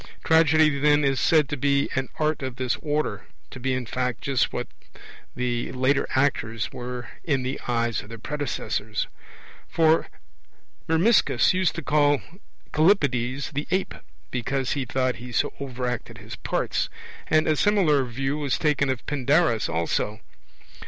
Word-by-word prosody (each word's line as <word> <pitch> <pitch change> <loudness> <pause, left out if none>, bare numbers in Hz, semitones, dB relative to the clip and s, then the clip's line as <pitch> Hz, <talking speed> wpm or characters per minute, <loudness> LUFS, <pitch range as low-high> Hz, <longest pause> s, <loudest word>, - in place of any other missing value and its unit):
Tragedy, 155 -2 +4
then, 150 +1 +4
is 135 -1 +1
said 155 -4 +4
to 145 - -1
be 140 +1 +2
an 130 0 -1
art 155 -1 0
of 130 -2 -4
this 125 -1 -1
order 150 0 -2 0.2
to 130 - -9
be 130 +1 -1
in 125 -1 -3
fact 125 0 -2
just 135 -3 +1
what - - -3 0.7
the 120 -1 -2
later 130 +2 +1
actors 115 -5 0
were 125 0 -6 0.2
in 140 -5 0
the 130 +2 -3
eyes 115 -2 0
of 105 - -14
their 115 - -8
predecessors; 110 -5 -3 0.6
for 160 -1 +3 0.8
Myrmiscus 180 +8 +4
used 185 -2 +1
to - - -5
call 145 -1 +3 0.5
Callippides 140 - +2
'the 145 +2 -3
ape', 185 +2 0 0.4
because 130 +2 -1
he 140 -3 -1
thought 130 0 0
he 125 +2 -9
so - - 0
overacted 125 -3 -4
his - - -9
parts; - - -1 0.4
and 155 0 +3
a 155 - +3
similar 165 -7 +3
view 135 +4 -2
was 140 -3 0
taken 145 -3 +1
of 130 -2 -2
Pindarus 145 -3 +2
also. 105 +6 -1
135 Hz, 150 wpm, -25 LUFS, 125-150 Hz, 0.8 s, Tragedy